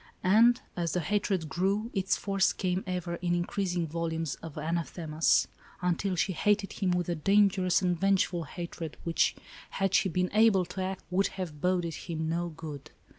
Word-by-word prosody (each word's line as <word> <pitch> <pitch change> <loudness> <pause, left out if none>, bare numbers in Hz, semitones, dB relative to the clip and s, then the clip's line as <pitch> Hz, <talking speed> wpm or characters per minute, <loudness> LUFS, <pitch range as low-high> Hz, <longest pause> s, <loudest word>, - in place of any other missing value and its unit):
And, 230 +6 +5 0.2
as 170 -3 -1
the 180 - +1
hatred 190 -1 0
grew, 200 +7 0
its 190 0 +1
force 195 -1 +1
came 185 0 -1
ever 180 -2 -3
in 175 -1 0
increasing 175 0 -1
volumes 165 -1 -2
of 160 -3 -9
anathemas, 160 0 +1 0.3
until 180 +2 0
she 185 +2 0
hated 200 +3 +1
him 190 -3 -1
with 180 -1 0
a 175 - 0
danger 195 +3 +3
ous 180 +1 +3
and 175 -2 +1
vengeful 190 -3 +1
hatred, 170 -3 -6
which, 165 -1 +2 0.3
had 195 -1 -1
she 190 - +3
been 180 +1 0
able 210 -4 +5
to 190 - -6
act, 190 0 -3
would 195 +2 +2
have 160 -6 -5
boded 180 -2 +1
him 160 -1 -4
no 170 +2 -1
good. 155 -3 -8
180 Hz, 175 wpm, -29 LUFS, 165-195 Hz, 0.3 s, And